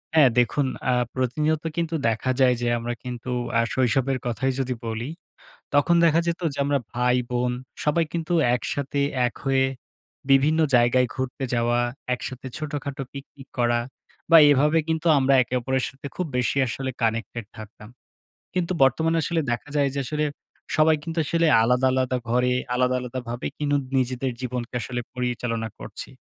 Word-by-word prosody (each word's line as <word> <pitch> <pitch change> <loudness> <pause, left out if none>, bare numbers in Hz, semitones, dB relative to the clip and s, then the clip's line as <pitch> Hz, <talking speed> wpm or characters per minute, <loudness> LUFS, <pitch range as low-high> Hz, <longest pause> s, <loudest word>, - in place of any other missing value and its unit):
হ্যাঁ। 145 -5 +7
দেখুন 135 +3 +2 0.2
আ - - +3 0.2
প্রতিনিয়ত 150 +5 0
কিন্তু 165 -1 -1
দেখা 115 +3 0
যায় 125 -1 +5
যে 120 - 0
আমরা 120 +1 -3
কিন্তু 125 0 -5 0.3
আ - - +5
শৈশবের 130 +1 +1
কথাই 130 +3 0
যদি 130 -1 -1
বলি। 115 +4 -3 0.6
তখন 145 +4 +4
দেখা 165 0 +4
যেত 170 0 -1
যে, - - -9
আমরা 140 -1 +1
ভাই-বোন 125 0 +1 0.3
সবাই 160 +2 +2
কিন্তু 170 0 -2 0.2
একসাথে 140 +2 -3 0.3
এক 120 - -2
হয়ে 135 0 +3 0.7
বিভিন্ন 145 +4 +4 0.2
জায়গায় 120 +1 +4
ঘুরতে 130 0 -4
যাওয়া, 120 0 +2 0.3
একসাথে 130 +1 -6
ছোটোখাটো 145 -2 -4
পিকনিক 135 0 -11
করা 120 0 +3 0.5
বা, 165 - +10
এভাবে 150 +4 +3
কিন্তু 160 +1 0
আমরা 135 +1 +3
একে 120 - -10
অপরের 130 +1 0
সাথে 135 +2 -9
খুব 180 - -2
বেশি 125 +2 0
আসলে 130 +3 -3
কানেক্টেড 115 0 -1
থাকতাম। 110 0 -11 0.6
কিন্তু 180 -1 -1
বর্তমানে 160 +5 +2
আসলে 165 0 0
দেখা 120 +5 -3
যায়, 140 -1 +3
যে 140 - -2
আসলে 150 +3 -1 0.5
সবাই 155 0 +5
কিন্তু 165 0 -6
আসলে 165 +2 +2 0.2
আলাদা, 125 +2 +3
আলাদা 130 -1 +1
ঘরে 125 +1 +2 0.2
আলাদা, 125 0 +2
আলাদাভাবে 125 -1 -5
কিন্ত 145 -1 0
নিজেদের 130 +1 0
জীবনকে 125 -1 -4
আসলে 125 0 -3
পরিচালনা 120 -2 -2
করছি। - - -7
130 Hz, 155 wpm, -24 LUFS, 125-145 Hz, 0.7 s, বা